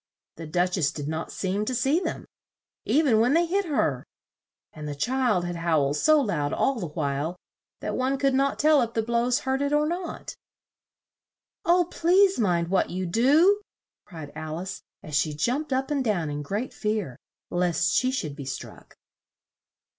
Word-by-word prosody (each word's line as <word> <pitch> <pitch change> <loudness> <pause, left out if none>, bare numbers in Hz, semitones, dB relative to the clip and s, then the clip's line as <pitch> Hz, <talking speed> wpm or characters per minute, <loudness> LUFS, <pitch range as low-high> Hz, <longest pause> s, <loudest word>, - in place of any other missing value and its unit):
The 165 -1 -7
Duch 180 +4 0
ess 145 -4 +2
did 145 -2 -6
not 160 +1 -4
seem 195 +2 -2
to 255 - -2
see 270 +6 +2
them, - - -4 0.6
e 310 - +3
ven 235 -7 +3
when 245 +6 +3
they 340 +1 +4
hit 390 +4 0
her; 215 - 0 0.7
and 150 -1 -7
the 145 - -4
child 235 - +1
had 175 -1 -4
howled 155 -4 +1
so 310 - +4
loud 165 - -1
all 265 -3 +1
the 180 - -3
while, 150 +2 -2 0.5
that - - -3
one 260 +2 0
could 275 0 +2
not 275 +1 +1
tell 305 -2 +4
if 230 -1 -3
the 225 - +1
blows 235 +2 +1
hurt 265 0 -1
it 285 0 0
or 300 0 +3
not. 345 +2 -4 1.3
"Oh, 350 +1 +4
please 375 +2 +3
mind 175 -5 +1
what 190 - +1
you 185 +1 -3
do!" 295 - +4 0.5
cried 160 -5 -9
Al 155 0 -5
ice, 185 +1 -6 0.2
as 150 - -5
she 155 0 +1
jumped 255 - -1
up 265 +2 -1
and 280 -2 +1
down 175 -10 0
in 145 0 -4
great 205 - -3
fear, 210 - -2 0.4
lest 175 0 +1
she 255 - +2
should 160 - -3
be 140 -2 -8
struck. 135 - -8
215 Hz, 180 wpm, -26 LUFS, -, 1.3 s, they